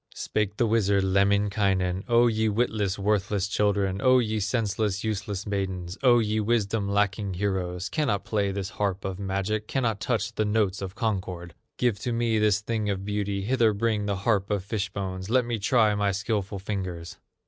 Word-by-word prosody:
Spake 105 -1 -2
the 120 - +3
wizard, 100 -3 +2
Lemminkainen: 100 -1 +1
"O 120 -1 +5
ye 110 -1 +2
witless, 105 -3 0
worthless 100 -1 0
children, 100 -1 0
O 130 0 +5
ye 110 -3 0
senseless, 105 -1 -1
useless 105 -2 -3
maidens, 95 -3 -3
O 125 -3 +6
ye 110 -1 +1
wisdom 105 -2 0
lacking 100 -1 0
heroes, 90 -2 -2
Cannot 135 -11 -1
play 100 -2 0
this 95 -1 -4
harp 100 -2 -2
of 95 0 -4
magic, 100 +2 -2
Cannot 115 -6 0
touch 115 +4 -1
the 110 - 0
notes 105 -2 0
of 95 +1 -5
concord! 95 -6 -3 0.2
Give 120 -5 +1
to 125 - -3
me 115 -1 +1
this 105 -1 +3
thing 110 -1 -2
of 95 -1 -2
beauty, 100 -1 -2
Hither 115 -1 +3
bring 105 -1 0
the 100 - 0
harp 100 0 0
of 100 -3 -1
fish 100 -1 -2
bones, 95 -1 -5
Let 125 +1 +3
me 120 -2 -2
try 110 0 +3
my 100 -1 +1
skillful 100 -1 -2
fingers." 95 -4 -5
100 Hz, 175 wpm, -26 LUFS, 95-110 Hz, 0.2 s, O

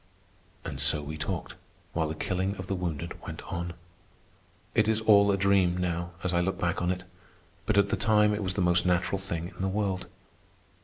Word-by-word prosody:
And - - -5
so 75 - +3
we 75 +2 -5
talked, 75 0 -4 0.4
while 80 -1 0
the 80 - -3
killing 95 +4 -1
of 95 - -6
the 100 - -2
wounded 85 -3 -4
went - - -7
on. 85 0 -3 1.0
It 110 - +3
is 110 0 +2
all 100 -2 +6
a 100 - +2
dream, 95 -2 +3
now, 85 -1 -1
as 90 - 0
I 85 - +3
look 95 +1 -1
back 85 0 0
on 90 - +1
it; 90 0 -2 0.6
but - - +2
at 100 0 +4
the - - +1
time 105 -1 +4
it 105 - -2
was 90 -2 -2
the 95 - 0
most 90 0 +3
natural 90 +2 +1
thing 85 -3 -4
in - - -7
the 95 - +1
world. 95 -2 -1
90 Hz, 205 wpm, -28 LUFS, 85-100 Hz, 1.0 s, all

